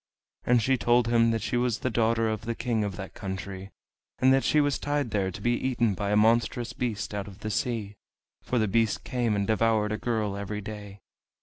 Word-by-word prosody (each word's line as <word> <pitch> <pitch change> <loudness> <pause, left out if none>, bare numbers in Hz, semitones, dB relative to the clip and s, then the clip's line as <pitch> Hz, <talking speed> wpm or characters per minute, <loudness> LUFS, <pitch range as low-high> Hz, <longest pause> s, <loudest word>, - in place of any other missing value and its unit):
And 120 -2 +4
she 135 +2 +2
told 120 -1 +3
him 115 -1 +4
that 115 -2 -1
she 120 - -1
was 120 -2 +1
the 130 - -2
daughter 115 0 +2
of 110 -1 -2
the 115 0 -2
King 115 -3 -1
of 100 -2 -3
that 95 -1 -7
country, 95 0 -6 0.5
and 130 +1 +4
that 135 - +3
she 155 - +3
was 145 -1 +1
tied 145 -5 -1
there 95 -2 0
to 90 - -8
be 120 - +1
eaten 120 -3 +1
by 100 +1 -3
a 105 - +2
monstrous 115 +2 +2
beast 110 -5 -3
out 100 -1 -3
of 95 -2 -12
the 110 - -3
sea; 110 -2 -2 0.5
for 125 - -2
the 110 -2 +2
beast 110 +1 +1
came 120 -4 0
and 100 -1 0
devoured 110 0 +2
a 105 - -2
girl 110 -4 -1
every 100 +1 -4
day. 105 -1 -8
110 Hz, 220 wpm, -27 LUFS, 105-120 Hz, 0.5 s, And